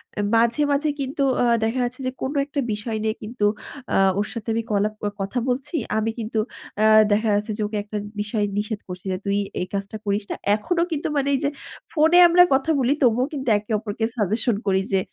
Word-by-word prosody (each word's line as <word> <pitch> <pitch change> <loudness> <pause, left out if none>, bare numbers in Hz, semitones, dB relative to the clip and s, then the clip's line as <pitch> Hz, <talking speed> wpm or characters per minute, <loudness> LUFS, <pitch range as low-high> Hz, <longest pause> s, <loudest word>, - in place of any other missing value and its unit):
অ্যা 205 - -1
মাঝে, 235 +4 +3
মাঝে 290 +2 +1
কিন্তু 275 +1 -3 0.2
আ - - +3 0.2
দেখা 225 +3 0
যাচ্ছে 245 +2 -4
যে, - - -1
কোন 265 - -1
একটা 285 0 -4
বিষয় 220 +2 -3
নিয়ে 220 0 0
কিন্তু 215 0 -2 0.5
আ - - +2 0.2
ওর 210 - 0
সাথে 230 -4 -7
আমি 230 +1 -1
কলা 205 0 +2 0.3
কথা 195 +6 -3
বলছি। 255 +6 -2 0.2
আমি 220 +1 0
কিন্তু 220 0 -2 0.4
অ্যা 215 +1 +4 0.2
দেখা 215 +2 +2
যাচ্ছে 210 +2 -1
যে, - - -3
ওকে 210 0 -4
একটা 210 +1 -5 0.2
বিষয়ে 210 0 -1
নিষেধ 210 0 -2
করছি 180 0 -8
যে, 185 - -1
তুই 200 0 +1 0.2
এই 180 - -2
কাজটা 200 +2 -3
করিস 200 +1 0
না। - - -1 0.2
এখনো 335 +11 -1
কিন্তু 310 -2 -1
মানে 280 -1 +1
এই - - 0
যে 285 - +2 0.4
ফোনে 320 +2 +4
আমরা 350 +1 +7
কথা 270 +4 +2
বলি, 260 +1 +3
তবুও 245 +1 +3
কিন্তু 270 -3 -5
একে 205 +2 -8
অপরকে 220 +1 -3
সাজেশন 220 +3 +1
করি 190 -1 +2
যে 195 - +3
220 Hz, 210 wpm, -23 LUFS, 210-260 Hz, 0.5 s, আমরা